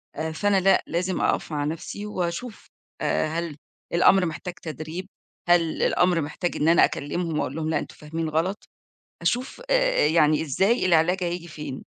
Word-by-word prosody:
آآ 160 +1 -3
فأنا 200 +4 +2
لأ، 195 +1 +4
لازم 180 +2 -1
أقف - - 0
مع 145 -1 -1
نَفْسي، 165 +6 -5
واشوف 195 +4 -4 0.3
آآ - - +1
هل 165 -1 -3 0.4
الأمر 185 +2 +5
محتاج 170 +2 -5
تدريب؟ 160 +2 -7 0.4
هل 170 -2 +3
الأمر 180 -2 +3
محتاج 155 +4 -3
إن 155 - +1
أنا 170 - +6
أكلمهم، 160 +2 -3
وأقول 135 - -2
لهم 160 -1 -2
لأ، 155 -2 +1
أنتم - - -8
فاهمين 160 +1 -4
غلط؟ 165 +6 0 0.7
أشوف 260 - -1
آآ - - +3
يعني 155 -1 +3
إزاي 190 - +1
العلاج 175 +2 +3
هييجي 175 0 -3
فين؟ 150 -3 -7
170 Hz, 160 wpm, -25 LUFS, 155-185 Hz, 0.7 s, أنا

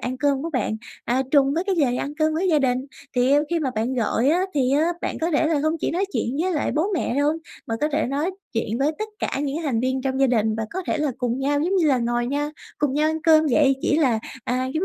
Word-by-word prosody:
ăn 255 +1 -3
cơm 280 0 +1
của 330 - -3
bạn, 245 -6 -1 0.3
à, 250 +2 +1
trùng 275 -1 +4
với 340 +3 0
cái 390 -2 0
giờ 285 -6 +3
đi 245 - -1
ăn 285 +3 -4
cơm 310 0 +2
với 365 +4 0
gia 315 -4 +4
đình. 260 -1 0 0.3
Thì, 250 +2 +3
ư, 290 +1 +4
khi 340 - +1
mà 285 -5 -1
bạn 230 +4 -1
gọi 240 +1 +1
á, 335 +4 +3
thì 260 -3 +2
á, 305 +4 +3
bạn - - -3
có 330 +2 0
thể 315 0 +2
là 315 -1 +1
hông 310 +2 +1
chỉ - - 0
nói 365 +4 0
chuyện 245 +4 -1
với 370 +1 0
lại 300 - -1
bố 310 +4 +1
mẹ 320 - -1
đâu, 285 +2 +2 0.3
mà 225 - -2
có 300 - +2
thể 305 +2 +1
nói 285 +7 -1 0.2
chuyện 225 0 -2
với 285 +3 +2
tất 430 - -3
cả 275 - -2
những 285 0 -2
thành 255 -7 0
viên 260 +1 -1
trong 265 0 -1
gia 270 - +5
đình 220 -3 +1
và 220 0 -3
có 375 - -4
thể - - 0
là 300 -1 0
cùng 245 -1 -1
nhau 285 +2 +1
giống 360 +6 +1
như 345 -4 +3
là 270 -4 +3
ngồi 240 0 0
nha, 290 +3 -1 0.3
cùng 285 -3 0
nhau 305 +1 +2
ăn 315 0 -4
cơm 315 -1 +5
vậy, 275 0 +4
chỉ 295 - +2
là, 255 -8 +3 0.3
à, 255 +1 -1
giống 320 +4 0
285 Hz, 285 wpm, -23 LUFS, 255-310 Hz, 0.3 s, gia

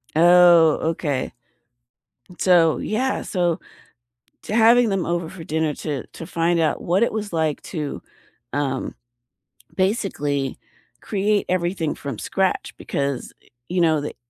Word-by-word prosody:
Oh, 170 -1 +6
okay. 145 -5 -2 1.0
And 180 - -16
so, 170 -4 +4
yeah. 255 +5 -1
So, 175 -3 0 0.9
to 215 - -3
having 235 0 +5
them 195 -3 -1
over 170 -1 -2
for 170 -2 -10
dinner 160 -1 -1
to 145 -4 -4
to 165 - -10
find 170 0 +1
out 160 - 0
what 185 +6 +2
it 235 - 0
was 210 -3 -4
like 160 -3 -1
to, 150 -5 -5 0.5
um, 140 -2 -2 0.8
basically 160 - -1 0.4
create 205 0 0
everything 175 -3 -1
from 140 -1 -6
scratch 190 -1 -1
because, 140 -2 -3 0.4
you 180 0 0
know, 160 -3 +3
that- 145 - -6
170 Hz, 130 wpm, -22 LUFS, 155-190 Hz, 1.0 s, Oh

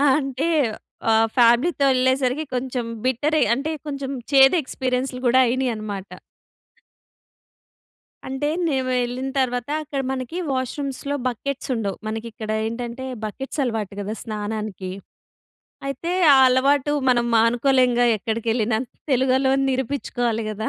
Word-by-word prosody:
అంటే, 275 +1 -1 0.6
ఆహ్, 225 0 +4
ఫ్యామిలీతో 245 +6 +4
ఎళ్ళేసరికి 260 +3 +1
కొంచెం 250 -1 -2 0.2
బిట్టరే, 290 +5 +1
అంటే, 295 +5 -3 0.2
కొంచెం 275 -2 -4 0.2
చేదు 270 +3 +7
ఎక్స్పీరియన్స్‌లు 255 0 -2
కూడా 255 +2 +5
అయినయన్నమాట. 215 -6 -2 2.2
అంటే, 270 +2 -2 0.2
మేము 265 -4 0
వెళ్ళిన 245 +2 -2
తర్వాత 245 0 -2
అక్కడ, 285 -2 -4
మనకి 265 +5 -4
వాష్‌రూమ్స్‌లో 275 +2 -3
బకెట్స్ 270 +3 -4
ఉండవు. 205 -4 -3
మనకి 220 +1 -4
ఇక్కడ 215 0 -5 0.2
ఏంటంటే, 240 +2 -5 0.2
బకెట్స్ 270 +7 -4
అలవాటు 220 -5 -2
కదా! 205 +2 -4
స్నానానికి. 210 -3 -4 1.0
అయితే, 275 +6 -3 0.2
ఆ - - +6
అలవాటు 275 +3 +2 0.2
మనం 240 -1 +2
మానుకోలేముగా! 245 +1 +3
ఎక్కడికెళ్ళిన, 225 +1 -1 0.4
తెలుగొళ్ళమని 265 +1 +2
నిరూపించుకోవాలి 245 -3 -2
కదా! 215 +1 -3
255 Hz, 105 wpm, -22 LUFS, 230-270 Hz, 2.2 s, చేదు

